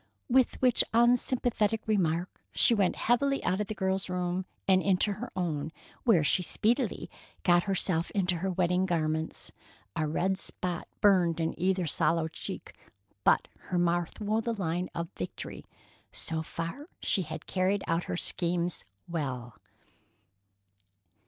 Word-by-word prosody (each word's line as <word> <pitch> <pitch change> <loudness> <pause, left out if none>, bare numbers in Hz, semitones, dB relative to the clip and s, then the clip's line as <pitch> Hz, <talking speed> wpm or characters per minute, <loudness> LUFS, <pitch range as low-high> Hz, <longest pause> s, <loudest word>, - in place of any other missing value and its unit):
With 255 -1 +3
which 250 -2 +5
unsympathetic 240 -2 +3
remark, 180 -5 0
she - - +5
went 200 -5 +2
heavily 275 +4 +1
out 185 +3 +1
of 210 - -2
the 215 - -4
girl's 190 0 -1
room, 180 0 -2 0.2
and 190 -1 +5
into 195 +2 +2
her 200 - -6
own, 160 -4 -2 0.3
where 200 -10 +5
she 165 - +3
speedily 225 - 0 0.4
got 175 -1 +4
herself 180 -4 0
into 180 -3 +1
her 190 +3 -2
wedding 180 0 +1
garments. 160 -2 -1 0.4
A 155 - 0
red 190 +5 0
spot 180 -3 -3
burned 180 -5 +4
in 165 0 0
either 185 0 +1
sallow 160 +1 +1
cheek, 160 - -7 0.5
but - - +4 0.2
her 180 - -2
mouth 175 -1 0
wore 215 +1 0
the 230 0 -2
line 180 -2 -2
of 170 0 -3
victory. 95 - -6 0.5
So 160 -1 -2
far 170 - -5
she 195 - +1
had 160 -2 -6
carried 190 +1 0
out 165 +1 0
her - - -3
schemes 175 0 0 0.2
well. 130 -8 -4
180 Hz, 140 wpm, -29 LUFS, 165-205 Hz, 0.5 s, which